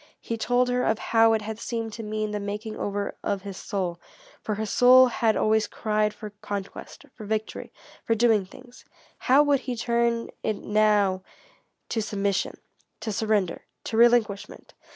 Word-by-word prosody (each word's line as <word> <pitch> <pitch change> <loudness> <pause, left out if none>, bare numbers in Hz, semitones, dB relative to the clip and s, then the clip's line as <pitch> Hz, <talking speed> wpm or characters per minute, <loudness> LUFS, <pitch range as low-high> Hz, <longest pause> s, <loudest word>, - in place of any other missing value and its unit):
He 230 - -4
told 245 +2 +1
her 250 0 +1
of 220 - +1
how 225 0 +3
it 220 -1 0
had 220 +1 -6
seemed 225 -2 -4
to 230 - -6
mean 215 0 -3
the 210 - -2
making 210 +2 -5
over 205 0 -3
of 200 -2 -2
his 200 -2 -7
soul. 185 -4 -3 0.4
For 215 - -3
his 215 0 -4
soul 255 +1 +7
had 225 -2 +1
always 220 0 +2
cried 215 -1 0
for 210 0 -9
conquest, 205 +6 -7
for 220 - -11
victory, 215 +1 -4 0.3
for 225 - +1
doing 220 -3 +3
things. 245 +5 -15 0.4
How 270 +3 +5
would 285 -2 +2
he 255 -1 -4
turn 235 0 0
it 215 - -1
now 205 -3 +2 0.7
to 225 - -1
submission, 200 -2 -1 0.4
to 220 0 -3
surrender, 210 -4 -1 0.2
to - - -4
relinquishment? 230 -4 +2
220 Hz, 165 wpm, -25 LUFS, 205-235 Hz, 0.7 s, soul